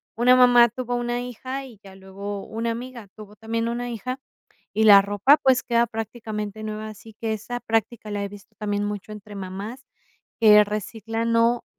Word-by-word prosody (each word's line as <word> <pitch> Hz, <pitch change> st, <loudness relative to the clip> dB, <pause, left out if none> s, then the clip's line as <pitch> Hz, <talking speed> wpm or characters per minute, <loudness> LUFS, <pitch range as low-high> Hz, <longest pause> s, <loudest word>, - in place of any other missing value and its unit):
una 245 Hz, +2 st, +5 dB
mamá 245 Hz, -1 st, +7 dB
tuvo 245 Hz, +1 st, -5 dB
una 240 Hz, 0 st, -1 dB
hija 255 Hz, +3 st, -6 dB
y 235 Hz, -6 st, -14 dB
ya 195 Hz, -1 st, -13 dB
luego 195 Hz, +1 st, -7 dB
una 230 Hz, +1 st, -3 dB
amiga 235 Hz, -1 st, -7 dB
tuvo 210 Hz, -1 st, -12 dB
también 230 Hz, +1 st, -2 dB
una 240 Hz, +1 st, -3 dB
hija, 245 Hz, +3 st, -5 dB, 0.6 s
y 220 Hz, -, +1 dB
la 205 Hz, -2 st, +9 dB
ropa, 205 Hz, +8 st, +4 dB
pues, 260 Hz, -1 st, +3 dB
queda 235 Hz, 0 st, +2 dB
prácticamente 220 Hz, -2 st, -5 dB
nueva. 215 Hz, 0 st, -5 dB
Así 215 Hz, +1 st, -12 dB
que 225 Hz, -1 st, -1 dB
esa 245 Hz, +3 st, -5 dB
práctica 225 Hz, -1 st, -2 dB
la 205 Hz, -1 st, -2 dB
he -, -, -4 dB
visto 200 Hz, 0 st, -14 dB
también 205 Hz, -1 st, -1 dB
mucho 205 Hz, 0 st, -5 dB
entre 210 Hz, 0 st, -10 dB
mamás 200 Hz, +7 st, -7 dB, 0.6 s
que 210 Hz, -2 st, +8 dB
reciclan, 225 Hz, +2 st, -3 dB
o, 230 Hz, +1 st, +3 dB
225 Hz, 180 wpm, -24 LUFS, 205-240 Hz, 0.6 s, la